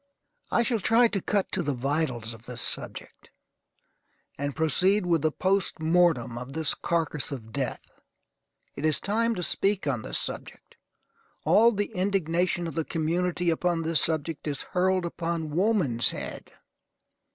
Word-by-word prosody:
I 235 - +2
shall 235 -1 0
try 230 +5 +4
to 200 -3 -1
cut 200 0 0
to 190 - 0
the 145 -4 -1
vitals 125 -4 -2
of 115 +1 -15
the 125 -1 -7
subject, - - -3 1.1
and 145 0 -4
proceed 180 +6 +2
with 170 -3 +2
the 155 0 +1
post 190 +2 0
mortem 160 -8 +2
of 125 +2 -8
this 160 -1 +2
carcass 160 -5 -1
of 115 -5 -7
death. 135 -1 -3 0.9
It 140 - -7
is 155 -2 +2
time 230 +3 0
to 180 - -3
speak 195 +3 +1
on 130 -6 -1
this - - -2
subject. - - -5 0.7
All 230 +3 +6
the 205 -2 -2
indignation 180 -2 0
of 165 - -5
the 165 - -1
community 170 +2 0
upon 170 0 0
this 165 -1 +3
subject 160 -1 -1
is 145 -2 -3
hurled 185 0 +1
upon 165 -2 -3
woman's 175 - +3
head. - - -5
165 Hz, 150 wpm, -27 LUFS, 145-185 Hz, 1.1 s, All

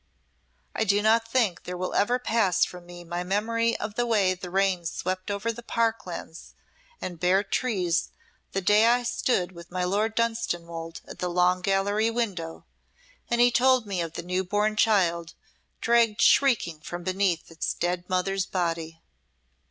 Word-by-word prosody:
I - - 0
do 205 0 +2
not 225 +1 +3
think 230 -7 +1
there 180 0 -5
will 185 +1 -3
ever 240 +5 +2
pass 220 -7 +2
from 180 -1 -11
me 175 0 -10
my 175 +1 -4
memory 230 +5 0
of 210 0 -5
the 240 +2 -1
way 200 -5 +3
the 180 0 -8
rain 190 -1 +1
swept 185 +3 -3
over 205 +3 -1
the 235 - -9
park 230 -2 -1
lands 170 -1 -8 0.4
and 175 -3 -6
bare 185 +3 +3
trees 195 -6 0 0.4
the 195 - -1
day 210 +4 +5
I 245 +1 +3
stood 240 -6 0
with 170 -1 -12
my 180 0 -2
Lord 210 +5 0
Dunstanwolde 170 -8 -2
at - - -10
the 180 - -1
Long 180 +1 +2
Gallery 200 +4 +1
window, 200 -9 -3 0.6
and 235 - +1
he 245 0 +6
told 255 -1 +3
me 195 -4 -2
of 165 -1 -4
the 170 - -5
new 180 +2 -1
born 210 +3 0
child 175 -7 +2 0.5
dragged 230 -2 +3
shrieking 230 - +3
from 175 +3 -6
beneath 185 -3 0
its 165 - -2
dead 175 0 -2
mother's 190 +1 0
body." 165 -2 -3
195 Hz, 165 wpm, -26 LUFS, 175-225 Hz, 0.6 s, he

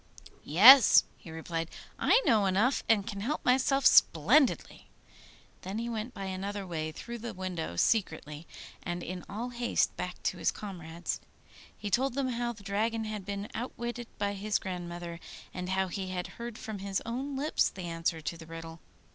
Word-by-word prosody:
'Yes,' 225 - +9
he - - -14
replied, 165 +1 -4 0.3
'I - - +4
know 215 -6 +4
enough, 210 +8 +2
and 210 -3 +4
can 200 -1 -5
help 285 +9 -2
myself 265 +2 +3
splendidly.' 240 - +4 0.7
Then 195 +3 -5
he 235 +1 -3
went 225 +1 -4
by 195 - -5
another 195 +1 -4
way 155 -3 -3
through 235 +9 -7
the 230 -2 -6
window 180 - -4
secretly, 155 - 0 0.3
and 175 0 -4
in 180 0 -6
all 230 +5 -4
haste 240 0 0
back - - -5
to - - -1
his - - +2
comrades. 170 -4 -5 0.6
He 205 -1 -5
told 260 +4 +1
them 275 -2 0
how 240 0 -1
the 210 -3 -12
Dragon 220 +3 -1
had 215 -3 -5
been 200 0 -4
outwitted 240 0 -5
by 200 0 -1
his 205 +2 0
grandmother, 175 -2 -6 0.3
and 180 0 -5
how 190 0 +1
he 190 +1 -4
had 180 -1 -3 0.2
heard 235 -1 -6
from 215 -2 -6
his 195 0 -2
own 265 +5 -3
lips 290 +3 +1
the 185 - -9
answer 165 -1 -2
to 165 +2 -4
the 165 -1 -12
riddle. 165 0 -8
200 Hz, 170 wpm, -30 LUFS, 175-235 Hz, 0.7 s, Yes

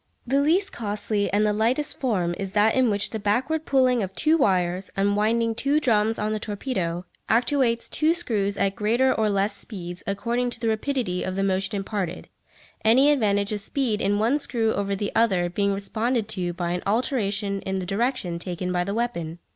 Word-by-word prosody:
The 270 +3 +2
least 350 +7 +2
costly 210 -1 -2
and 205 +2 +2
the 210 - +2
lightest 240 +8 0
form 190 -10 0
is 195 -1 -4
that 215 +1 +4
in 260 -2 +3
which 205 -1 -1
the 220 - -3
backward 260 +10 0
pulling 255 -3 +3
of 190 -1 -4
two 310 +1 +3
wires, 185 - +1
unwinding 215 +3 +2
two 280 +6 +1
drums 225 -5 +2
on 215 +1 -1
the 215 - -2
torpedo, 195 -6 -3 0.2
actuates 235 0 +2
two 315 +2 +1
screws 205 - -1
at 195 -1 +1
greater 235 +6 +2
or 220 -1 +1
less 200 +1 0
speeds 175 -5 -7
according 235 +5 -1
to 235 - -6
the 230 -1 0
rapidity 220 -5 -1
of 185 - -3
the 195 - 0
motion 195 +2 0
imparted, 195 -3 -4 0.5
any 260 +6 +5
advantage 205 -7 +1
of 210 -1 -2
speed 225 -1 -1
in 205 +1 +1
one 235 +8 +2
screw 225 -5 0
over 200 0 -1
the 200 +1 -3
other 185 -6 +2
being 200 +2 +1
responded 220 +3 -1
to 180 -4 -2
by 175 0 -3
an 180 0 -2
alteration 205 -4 0
in 190 0 -3
the 185 - -3
direction 195 -3 -1
taken 180 0 -4
by 180 -1 +1
the 200 +3 -3
weapon. 170 -9 -2
210 Hz, 190 wpm, -24 LUFS, 195-240 Hz, 0.5 s, any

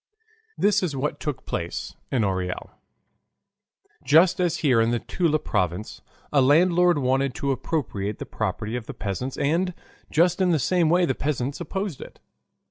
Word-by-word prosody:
This 205 0 +3
is 170 -6 -2
what 140 +3 -2
took 130 -4 -4
place 85 0 -4 0.2
in 125 -4 +2
Orel. 95 -2 -2 1.3
Just 165 +6 +5
as 175 -3 +1
here 125 -5 +5
in 115 - +2
the 120 - +1
Toula 160 +5 0
province, 95 - -2 0.3
a 140 - +5
landlord 175 +5 +4
wanted 135 -1 +1
to 140 - -1
appropriate 120 -7 -2
the - - -6
property 110 +2 -3
of 125 -3 -5
the - - -7
peasants 105 +6 -4
and 170 +5 0 0.3
just 175 +3 +2
in 185 - +3
the 165 - +3
same 170 +3 +2
way 175 +2 +4
the 130 - 0
peasants 140 +1 -2
opposed 190 -1 -4
it. - - -11
140 Hz, 160 wpm, -24 LUFS, 120-170 Hz, 1.3 s, Just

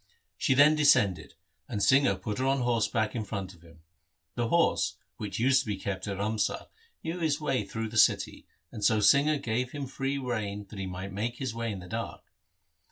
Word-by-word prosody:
She 130 - +1
then 145 +3 +7
descended, 105 - +3 0.3
and 100 - -2
Singha 130 -5 +4
put 100 +4 -5
her 130 - 0
on 135 -1 +2
horseback 115 -2 0
in 115 - -2
front 100 -3 -5
of 85 - -20
him. 80 -2 -18 0.5
The 120 -1 -1
horse, 170 +6 +2 0.2
which 100 -3 -5
used 130 +3 +4
to 130 - -4
be 105 -2 -2
kept 95 0 -4
at 100 -1 -3
Ramsar, 105 0 -1 0.3
knew 165 +2 -3
his 155 -4 0
way 135 -7 0
through 110 +3 -4
the 110 - -5
city, - - +2 0.2
and 105 - -7
so 110 +2 +4
Singha 140 +8 +4
gave 125 -1 -2
him 145 -2 -4
free 135 +1 -3
rein 110 -6 -3
that 105 - -8
he 95 - -3
might 95 +1 -6
make 115 +5 -2
his 130 -4 -3
way 115 -1 -3
in 95 -3 -6
the 90 - -10
dark. - - -5
115 Hz, 205 wpm, -29 LUFS, 100-135 Hz, 0.5 s, then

